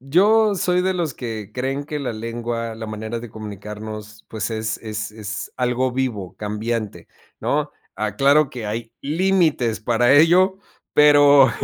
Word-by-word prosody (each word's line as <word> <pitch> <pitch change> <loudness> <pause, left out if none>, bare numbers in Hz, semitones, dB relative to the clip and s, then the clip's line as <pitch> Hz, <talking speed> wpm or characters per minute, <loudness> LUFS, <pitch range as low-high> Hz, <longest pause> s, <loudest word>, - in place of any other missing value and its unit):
Yo, 205 - +4
soy 180 -1 +1
de 185 +1 0
los 165 -6 -1
que 110 -5 -6
creen 135 +4 -2
que 150 0 -4
la 130 -5 -3
lengua, 115 0 -4
la 110 0 -7
manera 110 +2 -5
de 120 - -8
comunicarnos, 105 0 -8
pues, 110 0 -3
es 110 0 -2
es 105 -1 -5
es 110 0 -6
algo 125 +1 0
vivo, 120 -8 -3
cambiante, 110 +1 -3 0.3
¿no? - - -1 0.2
Aclaro 135 +8 +3
que 120 -4 -7
hay, 115 +2 -4
límites 155 - +1
para 120 +3 +3
ello, 180 +5 +5 0.4
pero 145 -3 +7
120 Hz, 145 wpm, -21 LUFS, 110-145 Hz, 0.4 s, pero